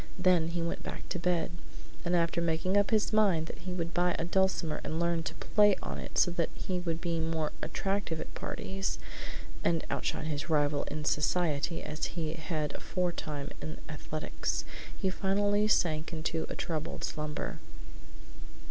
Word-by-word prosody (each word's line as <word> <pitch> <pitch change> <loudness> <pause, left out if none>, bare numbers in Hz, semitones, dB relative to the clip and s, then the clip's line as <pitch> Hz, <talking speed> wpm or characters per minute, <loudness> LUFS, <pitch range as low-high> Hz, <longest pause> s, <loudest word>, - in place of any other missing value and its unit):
Then 180 -3 +4
he 170 0 -1
went 170 - -2
back - - -6
to 180 - -1
bed, 175 -1 +1 0.5
and 175 0 +2
after 170 0 +2
making 170 +3 +1
up 205 0 +5
his 215 -1 +2
mind 195 -7 +4
that - - -7
he 185 +2 -5
would 170 -1 -2
buy 175 0 +3
a 165 - -1
dulcimer 185 -3 +2
and 160 +2 -2
learn 170 -1 +2
to - - -4
play 205 -2 +5
on - - -3
it - - -6
so 175 - +5
that 170 -2 +1
he 185 -1 -2
would 165 -2 -1
be 170 -1 0
more 160 -1 0
attractive 195 -4 -1
at - - -6
parties, 195 0 -2 0.7
and 165 -2 +2
outshine - - -1
his 155 +1 -2
rival 145 -2 +3
in 150 0 -4
society 155 0 +1
as 150 +1 -2
he 160 -2 0
had 155 -2 -2
aforetime 155 -5 -2
in 155 - -4
athletics, 155 0 -2 0.3
he 190 -2 +1
finally 205 +2 +2
sank 160 -6 +2
into 160 0 -1
a - - -3
troubled 160 -1 -3
slumber. 150 -1 -2
170 Hz, 165 wpm, -32 LUFS, 155-180 Hz, 0.7 s, up